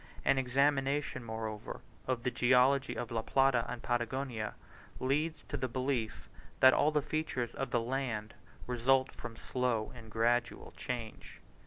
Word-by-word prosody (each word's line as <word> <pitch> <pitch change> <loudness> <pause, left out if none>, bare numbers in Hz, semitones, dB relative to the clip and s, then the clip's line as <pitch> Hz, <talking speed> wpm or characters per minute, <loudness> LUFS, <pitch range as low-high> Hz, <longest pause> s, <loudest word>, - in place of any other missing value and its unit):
An 135 - +4
examination, 135 +1 +1
moreover, 110 -2 -5 0.3
of 125 -2 -1
the 125 - 0
geology 130 +3 +4
of 120 - -4
La 115 -1 0
Plata 135 -1 +3
and 120 - -5
Patagonia, 120 -2 -2 0.4
leads 150 +5 0
to - - -4
the 130 - -1
belief 130 -2 -2 0.3
that 130 0 +8
all 150 - +4
the 150 -2 +1
features 130 -7 -2
of 135 - -3
the 120 - +2
land 115 -4 -2 0.3
result 130 +2 +2
from 115 - -8
slow 125 -4 -1
and 115 -3 -11
gradual 120 +2 0
changes. 120 -3 -5
125 Hz, 145 wpm, -33 LUFS, 115-135 Hz, 0.4 s, that